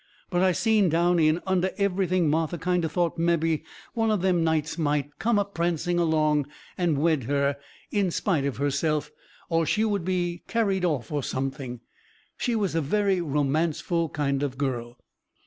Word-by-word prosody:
But 175 -1 +1
I 190 0 +4
seen 215 0 +3
down 170 +2 +2
in 155 +2 +3
under 190 -1 +1
everything 185 -3 +1
Martha 160 +3 0
kind 180 0 0
o' - - +1
thought 170 +1 -1
mebby 165 -2 +1 0.3
one 225 -2 +1
of 210 -4 +1
them 180 -3 +2
nights 160 -1 0
might 145 -3 -1
come 225 +2 +2
a 205 - +2
prancing 175 -2 -1
along 155 -3 +2 0.3
and 175 -5 +1
wed 155 -4 +1
her 140 +1 +1 0.4
in 200 -3 +1
spite 170 -3 0
of 140 - -2
herself, 145 +2 0 0.4
or 165 -1 +1
she 215 +7 +2
would 205 -4 0
be 175 -1 -1
carried 200 -5 0
off, 145 -10 -1
or 145 -1 0
something. 130 -2 -4 0.5
She 240 -3 -1
was 200 -6 0
a 165 - +1
very 195 +5 +1
romanceful 155 +2 0
kind 140 -2 -1
of 135 -3 -2
girl. 120 -4 -3
165 Hz, 170 wpm, -26 LUFS, 145-185 Hz, 0.5 s, I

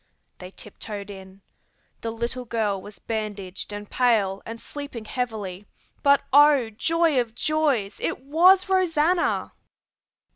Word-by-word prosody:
They 180 - -8
tiptoed 205 +1 -8
in. 190 0 -12 0.6
The 230 - -3
little 235 +3 -3
girl 215 -4 -1
was 205 -1 -11
bandaged 205 -3 -5
and 205 0 -6
pale 210 -6 +2
and 230 +1 -6
sleeping 280 -6 -8
heavily; 210 -5 -4 0.3
but 280 0 +4
oh, 285 -5 +6
joy 325 +4 +2
of 230 -1 -7
joys, 280 -9 0
it - - -2
was 355 +8 +5
Rosanna! 355 -2 +1
230 Hz, 120 wpm, -25 LUFS, 205-290 Hz, 0.6 s, oh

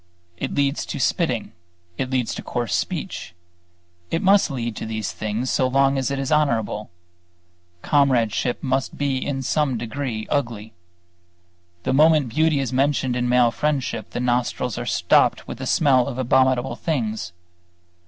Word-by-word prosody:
It - - -4
leads 140 0 +1
to 145 - -4
spitting; 125 - 0 0.4
it 130 +5 -3
leads 130 -3 0
to - - -5
coarse 120 -6 -3
speech; 85 - -3 0.7
it 165 - -1
must 195 0 +5
lead 120 -5 -3
to - - -4
these 110 -2 -3
things 110 +4 -3
so 130 - +2
long 135 +1 +3
as 130 - -1
it 140 - -2
is 135 0 -3
honorable; 115 -8 +1 0.9
comradeship 125 -4 +1
must 135 0 -1
be 135 -2 -1
in 135 -2 -3
some 135 -1 0
degree 115 -1 -4
ugly. 115 -6 -2 1.1
The - - 0
moment 150 -2 +4
beauty 155 +4 +2
is 130 -2 -2
mentioned 135 -1 +1
in 125 0 0
male 125 -1 +4
friendship, 135 -6 -2
the - - -4
nostrils 125 -1 0
are - - -5
stopped - - +2
with - - -7
the - - -4
smell 130 -5 +3
of 130 -3 -5
abominable 130 -1 +2
things. 110 - -2
130 Hz, 155 wpm, -22 LUFS, 120-140 Hz, 1.1 s, must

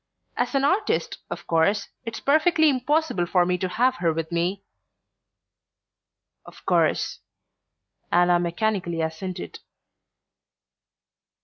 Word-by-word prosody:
As - - -1
an 275 - +2
artist, 415 - 0
of - - -6
course, 185 +5 +1 0.2
it's 230 -1 -5
perfectly 315 +2 +3
impossible 275 - 0
for 180 0 +3
me 180 0 0
to 185 - -1
have 255 +7 +1
her 170 -2 +1
with 160 0 -4
me..." 175 +4 -1 1.8
"Of - - -15
course," - - +1 0.9
Anna 175 0 +4
mechanically 175 -1 -1
assented. 160 - -5
190 Hz, 105 wpm, -24 LUFS, 170-270 Hz, 1.8 s, Anna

